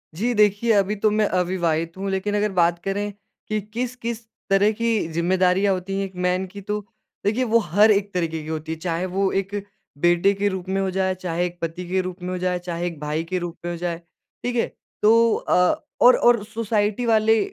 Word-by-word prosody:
जी, 235 +7 0
देखिए 210 +1 +3
अभी 200 +1 +2
तो 210 +1 +2
मैं 215 0 +2
अविवाहित 175 -3 0
हूँ, 195 +1 -3
लेकिन 200 +2 -1
अगर 210 0 +1
बात 170 -1 +2
करें 205 +1 -2 0.4
कि 215 0 0
किस 250 +1 -2
किस 235 -1 -5 0.2
तरह 200 +2 +4
की 230 -7 +1
जिम्मेदारियाँ 185 +3 +2
होती 185 +1 -4
हैं 195 - 0
एक 190 -1 -11
मैन 180 +1 +1
की, 200 +2 -10
तो 210 +2 -2 0.5
देखिए, 225 +5 +2
वो 230 -1 +3
हर 205 +3 +4
एक 200 -1 +1
तरीक़े 165 -3 -1
की - - -10
होती 160 0 -4
है, 160 - -3
चाहे 170 +1 -2
वो 190 +1 0
एक 195 +1 -2 0.4
बेटे 175 +5 +3
के 200 +1 0
रूप 190 -1 -5
में 195 0 0
हो 190 - 0
जाए, 190 0 0
चाहे 175 -1 -2
एक 175 0 -6
पति 170 +2 -4
के 185 +1 +1
रूप 185 0 -7
में 180 - -4
हो 185 - -2
जाए, 180 0 -1
चाहे 175 0 -3
एक 165 -4 -6
भाई 150 +2 -2
के 185 - +1
रूप 175 -1 -6
में 175 - -2
हो 170 - -4
जाए। 170 -1 -2 0.5
ठीक 245 0 -2
है? 235 - +1 0.3
तो 230 +2 +5
अ, 180 0 +1 0.2
और 250 - +9
और 240 -3 +4
सोसाइटी 215 0 -1
वाले 220 -1 +4
190 Hz, 220 wpm, -23 LUFS, 175-210 Hz, 0.5 s, और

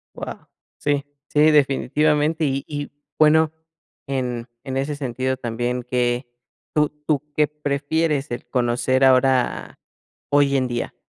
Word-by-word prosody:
Guau. - - -7 0.3
Sí, 145 -1 0 0.2
sí, 150 +1 +4
definitivamente. 150 +2 +2
Y 135 0 -1
y 145 -1 -5 0.3
bueno, 155 0 +5 0.6
en 125 -3 -2 0.2
en 135 -1 -4
ese 140 +2 -1
sentido 130 -1 -2
también, 120 +1 -2
que, 125 0 0 0.5
¿tú 150 -1 +3 0.2
tú 150 -2 +1
qué 150 -1 +3
prefieres, 150 0 -1
el 120 - -5
conocer 125 +1 +1
ahora, 130 -1 +3 0.5
hoy 145 -1 +4
en 130 -1 +1
día? 120 -1 -3
135 Hz, 125 wpm, -22 LUFS, 125-150 Hz, 0.6 s, bueno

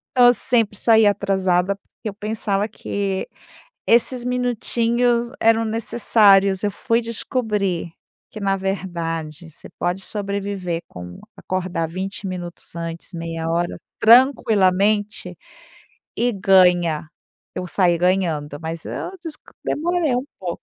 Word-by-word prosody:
Então 245 -1 +7
eu 245 - +7
sempre 230 -5 +1
saía 220 -2 +5
atrasada 190 -2 +1
porque 200 +2 -12
eu 205 - -4
pensava 210 -1 -2
que 200 -2 -3 0.6
esses 240 +1 +3
minutinhos 240 -1 +1
eram 225 0 +4
necessários. 205 -3 +3
Eu 205 - +1
fui 230 +3 0
descobrir 210 -7 -2 0.4
que, - - -9
na 195 -1 0
verdade, 170 -4 -4
você - - -14
pode 175 +2 -3
sobreviver 200 -4 -3
com 90 0 -10 0.2
acordar 185 -3 -3
20 190 +3 -5
minutos 175 -2 -8
antes, 165 +2 -6
meia 165 -1 -4
hora, 170 +1 -1 0.2
tranquilamente, 210 -5 +3 0.8
e 245 +1 +1
ganha. 180 -5 +3 0.5
Eu 180 - -4
saí 175 -2 +2
ganhando, 165 -5 0
mas 160 0 -5
eu - - -5
desc 305 -2 -7 0.2
demorei 335 -3 0
um 250 - -2
pouco. 175 -3 -5
195 Hz, 120 wpm, -21 LUFS, 175-225 Hz, 0.8 s, Então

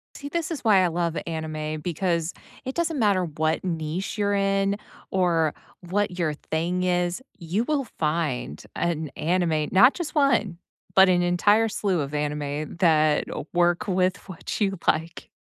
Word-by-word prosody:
See, 285 - -7
this 335 +1 -2
is 320 - -4
why 205 -5 +5
I - - +3
love 170 -1 -1
anime 155 -1 -4
because 170 0 -1 0.3
it 260 - -4
doesn't 330 -3 -1
matter 200 -5 +3
what 155 0 -1
niche 170 +2 -3
you're 205 -1 +1
in 195 0 +1 0.4
or 170 -5 +2 0.3
what 190 +1 -1
your 165 -4 0
thing 170 +4 -2
is, 180 +2 0 0.2
you 175 +6 -1
will 290 -2 0
find 150 - -1
an 160 -3 -1
anime 165 -3 0
not 245 +8 +7
just 340 -3 -5
1, 230 - +2 0.4
but 190 0 +7
an 180 -1 +3
entire 205 +6 +3
slew 195 -5 0
of 140 +1 -5
anime 150 0 -3
that 155 -3 +3 0.3
work 175 +1 +2
with 185 0 +1
what 185 -4 -6
you 195 -2 +1
like. 165 +2 0
175 Hz, 155 wpm, -25 LUFS, 160-200 Hz, 0.4 s, not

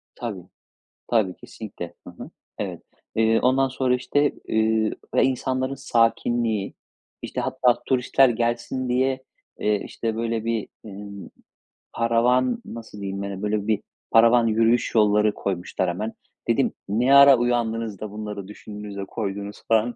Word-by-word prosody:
Tabii. 100 -8 -6 0.6
Tabii 105 -6 +2
kesinlikle. 95 -6 -9
Hı - - -7
hı. - - -10 0.3
Evet. - - -4 0.3
Iıı, 115 0 +3
ondan 130 +1 +3
sonra 130 -1 +1
işte, 145 +3 +1 0.2
ııı, 110 0 +2 0.2
ve - - +4
insanların 130 +1 0
sakinliği, 115 -4 +1 0.5
işte 125 - -4
hatta 125 -1 +1
turistler 130 +1 +4
gelsin 120 +2 -1
diye, 130 +1 +1 0.4
ııı, 105 -1 +1
işte 115 -1 -4
böyle 115 -1 -2
bir, 115 -2 -1 0.2
emm, 100 -1 -9 0.7
paravan, 120 +2 +2
nasıl 110 -3 -9
diyeyim, 100 0 -4
böyle, 105 0 -1
bir 110 -2 +1 0.3
paravan 115 +1 +6
yürüyüş 115 +2 +2
yolları 105 0 +4
koymuşlar 95 -1 -2
hemen. 105 +6 -3 0.3
Dedim, - - +2 0.2
ne 125 +7 +4
ara 140 -2 +9
uyandınız 115 -3 -1
da, 110 -2 -6
bunları 105 -2 -6
düşündünüz 105 -1 -9
de, 100 - -4
koydunuz 100 -1 -5
falan... 115 +1 +2
115 Hz, 130 wpm, -24 LUFS, 105-125 Hz, 0.7 s, ara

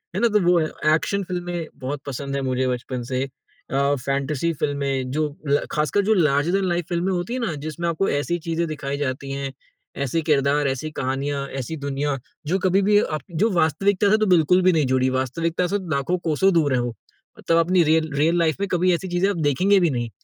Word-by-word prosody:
है - - 0
ना? 235 - +4
तो 210 -2 +2
वो 175 0 +4
है। 155 - +1 0.3
एक्शन 200 +5 -1
फ़िल्में 175 -2 -4
बहुत 135 +2 -4
पसंद 140 +1 -4
हैं 140 - -1
मुझे 130 -1 0
बचपन 125 0 -3
से। 130 +1 0 0.5
अ, 140 +1 +2
फैंटेसी 140 +3 0
फ़िल्में 140 -3 -2
जो 155 +2 0 0.2
ल 140 +1 +2
ख़ासकर 150 +7 +1
जो 220 - +4
लार्जर 150 -4 +2
देन 195 0 +1
लाइफ 175 -1 -1
फ़िल्में 175 +2 0
होती 180 +6 -2
हैं 255 - -2
ना, 195 -8 -1
जिसमें 155 +4 -4
आपको 170 +4 0
ऐसी 145 +5 0
चीज़ें 165 +1 0
दिखाई 140 -2 -4
जाती 135 -1 -3
हैं, 135 0 -3 0.5
ऐसे 140 +5 0
किरदार, 145 -1 +2
ऐसी 135 +4 -3
कहानियाँ, 140 +1 -2 0.2
ऐसी 160 +6 -5
दुनिया 140 0 -1 0.3
जो 185 +5 +1
कभी 190 +1 +2
भी 205 0 +6 0.2
आप - - -12
जो 185 +7 +1
वास्तविकता 185 +4 +2
से 215 - +5
तो 215 - +1
बिल्कुल 175 +3 +4
भी 185 0 +5
नहीं 155 -3 +2
जुड़ी, 130 0 +2
वास्तविकता 165 +7 -1
से 200 - 0
तो 185 - -9
लाखों 140 +6 0
कोसों 190 +6 +3
दूर 155 -5 +2
हैं 125 - +2
वो, 120 -1 -3 0.4
मतलब 165 - +1
अपनी 175 +2 +4
रियल 160 0 +2
रियल 160 +4 +3
लाइफ 160 -2 +2
में 200 - -1
कभी 180 0 +3
ऐसी 180 +2 -2
चीज़ें 175 +2 +1
आप 200 - -2
देखेंगे 190 +8 +3
भी 175 -2 +3
नहीं। 120 -4 -2
155 Hz, 215 wpm, -23 LUFS, 140-180 Hz, 0.5 s, भी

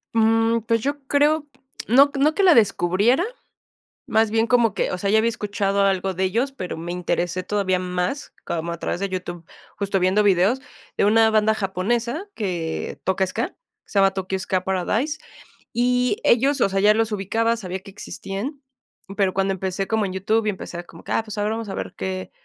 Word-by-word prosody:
Mm, 225 +1 +3
pues 230 -1 +2
yo 285 +3 -2
creo, 295 +2 +2 0.4
no 275 +5 +6
no 305 +3 +3
que 400 - +2
la 360 - +7
descubriera, 215 - +3 0.8
más 220 -1 +2
bien 225 +1 +2
como 235 -4 +3
que - - -1
o - - -2
sea, 200 +2 -1
ya 220 - +5
había 230 +1 +2
escuchado 200 -3 -1
algo 190 -1 0
de 190 - -1
ellos, 230 +9 0
pero 185 -10 -5
me 170 +2 -6
interesé 180 0 -2
todavía 190 -1 0
más 180 +8 -3
como 170 0 -3
a 170 - -6
través 175 - -2
de 200 - -2
YouTube, 175 -2 -5 0.3
justo 200 -1 0
viendo 190 +3 +3
videos 200 +6 +3 0.4
de - - +3
una 220 +1 +5
banda 220 0 +3
japonesa 230 - -1
que 175 - -3
toca 190 0 +1
Ska, - - -2
que - - -31 0.3
se 200 - 0
llama 195 0 +5
Tokyo 190 0 -2
Ska 185 -1 -1
Paradise, 215 - -1 0.5
y 250 - +2
ellos, 270 +4 +3
o - - +4
sea, 195 0 0
ya 210 +2 +5
los 225 0 0
ubicaba, 225 +4 0
sabía 190 -3 -5
que 195 - -13
existían, 210 +7 -6 0.6
pero 195 -2 +2
cuando 195 0 +1
empecé 190 +1 -3
como 220 -2 +1
en 185 - -4
YouTube 215 +4 0
y 215 - +2
empecé 175 -2 -7
como 165 -1 -14
que, - - -8
ah, 225 - +1
pues 215 -1 -6
ahora 210 +1 0
vamos 225 -1 -4
a 195 - -4
ver - - -5
qué 185 0 -4
205 Hz, 200 wpm, -23 LUFS, 185-230 Hz, 0.8 s, la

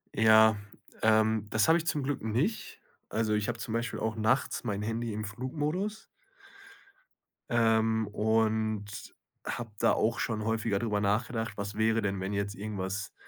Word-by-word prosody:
Ja, 110 -1 +6 0.4
ähm, 110 -1 +3
das 110 +5 +2
habe 165 +1 +6
ich 165 - -4
zum 145 -3 0
Glück 145 +1 -2
nicht. 125 - -1 0.3
Also 110 0 0
ich 105 0 0
habe 120 -1 -2
zum 110 - -4
Beispiel 115 +1 -2
auch 110 0 -1
nachts 110 +5 +1
mein 105 -4 -2
Handy 115 +1 -2
im 110 +1 -3
Flugmodus. 150 - -3 1.5
Ähm, 110 -2 +2
und 110 -1 0 0.3
habe 115 -2 -4
da - - +4
auch 115 +2 +1
schon 110 -2 -2
häufiger 115 -2 0
drüber 105 -2 0
nachgedacht. 110 +2 -1
Was 100 0 -4
wäre 110 +1 +2
denn, 100 -2 -1
wenn 95 +2 -3
jetzt 100 0 -2
irgendwas, 100 0 -4
110 Hz, 155 wpm, -30 LUFS, 105-115 Hz, 1.5 s, Ja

